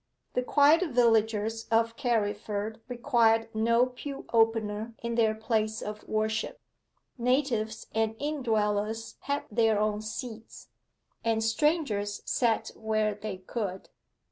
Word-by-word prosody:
The 250 - +1
quiet 290 +6 +5
villagers 225 -2 +2
of 230 0 +2
Carriford 215 -2 -1
required 235 -3 +2
no 230 +2 +3
pew 270 +2 -7
opener 225 -1 +1
in 235 0 -2
their 225 -2 +2
place 220 0 -1
of 210 0 -6
worship: 220 0 -1 0.6
natives 235 -4 0
and 220 0 0
in 295 +2 -3
dwellers 215 -1 -1
had 285 +1 -2
their 225 -1 +3
own 210 0 0
seats, 220 +1 -7 0.5
and 225 -1 +1
strangers 225 -5 0
sat 230 -3 +1
where 215 -1 0
they 205 -1 -6
could. 190 0 -5
225 Hz, 115 wpm, -29 LUFS, 215-235 Hz, 0.6 s, quiet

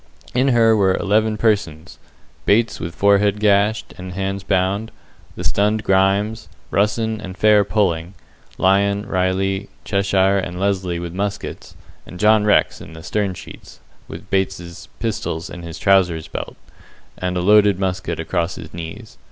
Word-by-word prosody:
In 130 +2 +2
her 115 -3 +4
were 95 -3 +3
eleven 110 +2 +1
persons; 85 -8 -1 0.5
Bates 115 +3 +2
with 85 0 -6
forehead 100 +2 +3
gashed, 105 +1 +2
and 90 0 -7
hands 95 +1 -3
bound, 95 +3 0 0.5
the - - -6
stunned 105 +2 +1
Grimes, 100 +3 +1 0.2
Russen 110 +2 0
and 95 -1 -8
Fair 105 -1 +5
pulling, 95 -3 -1 0.4
Lyon, 100 +2 +2
Riley, 95 +1 -1 0.2
Cheshire, 100 -1 +2
and 90 -1 -5
Lesly 95 -3 -1
with 85 -1 -6
muskets, 100 +2 -5 0.3
and 90 - -10
John 105 0 +4
Rex 105 - +2
in - - -11
the 80 0 -11
stern 100 -1 -1
sheets, - - -12 0.3
with 90 +5 -10
Bates's 95 -3 -2
pistols 105 -7 -3
in 90 - -8
his 85 -1 -8
trousers' 90 -3 +2
belt, - - -6 0.6
and 90 0 -3
a - - 0
loaded 105 0 +5
musket 95 -1 -2
across 85 0 -2
his 75 - -10
knees. 85 +7 -9
100 Hz, 145 wpm, -20 LUFS, 90-105 Hz, 0.6 s, Fair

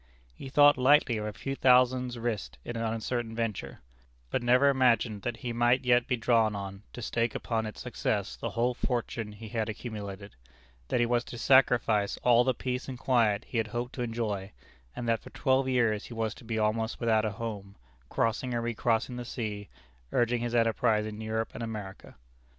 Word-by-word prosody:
He 135 - -9
thought 145 -1 +6
lightly 130 -3 +4
of 105 0 -3
a - - -3
few 135 +5 -5
thousands 125 -1 +3
risked 110 - -3
in 120 - -5
an 115 - -3
uncertain 115 +1 -2
venture; 115 -3 -4 0.5
but - - 0
never 125 +3 +4
imagined 120 -5 +2
that 120 +3 -3
he 120 - -2
might 120 +2 +2
yet 120 -1 +4
be 125 - 0
drawn 115 -2 +2
on 100 0 -6
to 120 - -7
stake 115 0 -1
upon 110 -2 -2
its 105 - -8
success 105 -4 -2
the - - -4
whole 120 +2 0
fortune 120 -3 -3
he 105 +1 -10
had 110 -1 -2
accumulated; 105 -3 -7 0.5
that - - 0
he 120 - +4
was 120 0 +1
to 120 - -8
sacrifice 120 -5 +3
all 120 -1 +5
the 130 -1 +1
peace 125 +2 -3
and 130 - -5
quiet 115 -5 +2
he 120 - -2
had 110 - 0
hoped 120 +3 -4
to 125 - -5
enjoy; 110 -4 -3 0.4
and 120 - -4
that 115 -1 +2
for - - -12
twelve 130 -1 +1
years 115 -4 +1
he 120 - -9
was 110 -1 -1
to - - -15
be 115 -1 -3
almost 110 +1 0
without 110 -2 +2
a 110 -2 -1
home, 100 -3 -6 0.3
crossing 120 +2 0
and 115 - -1
re 120 0 -1
crossing 115 +2 0
the 125 - -4
sea, 105 -4 -5 0.4
urging 120 0 +1
his 120 0 -2
enterprise 115 -1 +2
in 110 0 -6
Europe 110 0 -2
and 110 - -7
America. 105 -4 -7
115 Hz, 195 wpm, -29 LUFS, 110-125 Hz, 0.5 s, thought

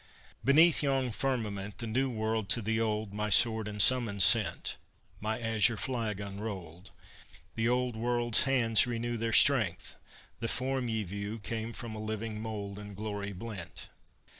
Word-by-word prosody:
"Beneath 155 +6 +6
yon 135 -3 0
firmament. 105 -6 -3
The 115 - -4
New 130 +4 0
World 110 -3 -2
to 115 - +1
the 110 +2 0
Old 105 -2 -2
My 105 +1 -2
sword 110 +1 +5
and 105 0 -6
summons 110 -3 +3
sent, 105 +3 +2 0.4
My 110 +2 -2
azure 115 -1 +2
flag 115 -2 -3
unrolled: 100 -3 -7 0.6
The 115 +1 0
Old 125 -1 0
World's 120 0 +1
hands 120 -4 +3
renew 120 0 -2
Their 115 0 -2
strength; 110 -8 +3 0.4
the 115 - -2
form 130 +1 -1
ye 110 -1 -1
view 100 +3 -5
Came 115 +1 -4
from 115 -1 -7
a 110 - -6
living 110 0 -4
mould 105 -3 -5
In 105 -1 -9
glory 100 -1 -4
blent. 95 -3 -7
110 Hz, 155 wpm, -30 LUFS, 105-120 Hz, 0.6 s, Beneath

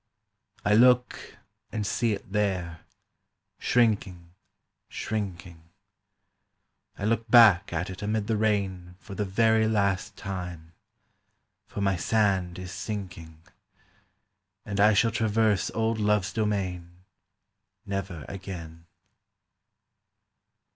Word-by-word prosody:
I 105 - +3
look 125 +2 +3 0.3
and 105 -2 -3
see 115 +3 0
it 100 -1 -8
there, 95 -5 -1 0.8
shrinking, 100 -7 0 0.6
shrinking, 90 -5 -5 1.4
I 100 - -4
look 115 +1 0
back 105 -5 +7
at 85 +2 -2
it 95 - -9
amid 105 0 -1
the 110 +1 0
rain 95 -4 -1
For 100 - -11
the 105 +1 -2
very 110 +3 +3
last 100 -3 0
time; 90 -4 -6 0.9
for 100 - -6
my 95 -2 +1
sand 95 -3 +1
is 90 0 -7
sinking, 85 -6 -7 1.2
And 100 -1 -4
I 105 +1 +5
shall 115 +3 +3
traverse 110 -2 +1
old 115 0 0
love's 105 -2 +1
domain 90 -5 -3 0.8
Never 95 -6 -4
again. 85 -4 -8
100 Hz, 100 wpm, -27 LUFS, 90-110 Hz, 1.4 s, back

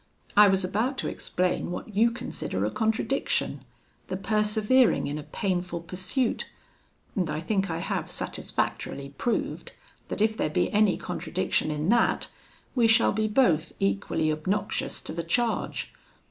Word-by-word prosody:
I 210 0 +9
was 190 -1 +3
about 225 +9 -1
to - - -1
explain 180 -1 -1
what 195 +4 -6
you 225 +3 +5
consider 235 - -3
a - - -1
contradiction 225 +4 0 0.4
the 185 - -3
persevering 215 +4 +3
in 145 +1 -3
a 150 - -11
painful 180 -4 -2
pursuit; 185 +9 -1 0.7
and 180 -5 0
I 150 0 -2
think 195 +3 0
I 165 - -2
have 170 - -2
satisfactorily 140 0 -3
proved, 240 - -2 0.3
that - - -4
if 220 +1 +3
there 155 - 0
be - - +1
any 210 -2 +4
contradiction - - -1
in 150 +3 -1
that, 235 +1 +3 0.4
we 240 -3 +4
shall 225 +1 +5
be 215 +1 0
both 195 - +2
equally 195 -5 +1
obnoxious 190 +7 -1
to - - -6
the 170 - -2
charge. 235 +8 -1
200 Hz, 145 wpm, -27 LUFS, 170-225 Hz, 0.7 s, I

